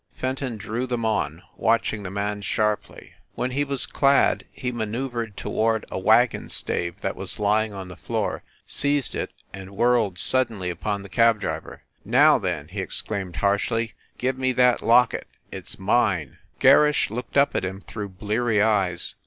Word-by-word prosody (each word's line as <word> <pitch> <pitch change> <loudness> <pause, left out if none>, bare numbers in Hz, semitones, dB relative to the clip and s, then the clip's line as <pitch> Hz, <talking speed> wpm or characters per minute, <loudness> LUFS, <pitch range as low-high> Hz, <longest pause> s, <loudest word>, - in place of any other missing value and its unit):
Fenton 130 -2 -3
drew 110 +5 -3
them 120 -2 -2
on, 85 -6 -1
watch 115 0 +1
ing 105 -2 -6
his 95 - -5
man 100 +1 -2
sharply. 105 +1 -2 0.2
When 125 - -2
he 140 +3 0
was 140 -2 +1
clad 140 0 +2
he 125 -2 -4
manceu 120 +3 -3
vered 115 -4 -4
toward 110 +1 -1
a - - -3
wagon - - +3
stave 85 -1 -1
that - - -2
was - - -5
lying 105 +1 +1
on 95 -2 -7
the 90 - -10
floor, - - -3 0.2
seized 145 -2 +1
it, - - -3 0.2
and 95 +1 -10
whirled 120 -6 +2
suddenly 110 -5 +2
upon 100 +3 -3
the - - -9
cab 115 +2 +3
driver. 100 - -5 0.2
"Now 135 +7 +5
then/ 85 -7 -3
he 95 +2 -4
exclaimed 95 -1 -2
harshly, 105 - 0 0.2
"give 130 +1 -1
me 130 0 +1
that 125 -1 +3
locket! 120 +1 +3 0.2
It - - -8
s - - -4
mine." 95 - 0 0.2
Gerrish 150 -7 +5
looked 125 +4 -4
up 140 +1 +3
at - - 0
him 95 +1 -4
through 105 -1 -7
bleary 105 +4 0
eyes. 100 -5 +2
110 Hz, 170 wpm, -24 LUFS, 100-125 Hz, 0.2 s, Now